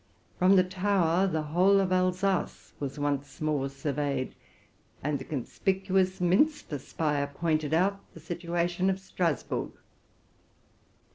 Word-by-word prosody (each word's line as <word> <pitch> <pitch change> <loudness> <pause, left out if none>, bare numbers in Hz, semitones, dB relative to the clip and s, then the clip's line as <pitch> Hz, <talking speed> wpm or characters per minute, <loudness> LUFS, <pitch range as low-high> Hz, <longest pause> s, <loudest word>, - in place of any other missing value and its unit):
From 185 +2 +6
the 185 - +6
tower 185 -1 +1
the 160 -4 -1
whole 180 +6 +4
of 190 -1 0
Alsace 185 +1 0
was 140 -1 -4
once 145 -1 -2
more 150 -3 0
surveyed, 140 -1 -2 0.7
and 145 0 0
the - - -6
conspicuous 190 - 0
minster 180 - +2
spire 145 +1 -1
pointed 155 0 -1
out 190 +5 +2 0.2
the - - -9
situation 175 +1 -1
of 190 0 0
Strasburg. 180 -4 -2
175 Hz, 120 wpm, -29 LUFS, 145-190 Hz, 0.7 s, From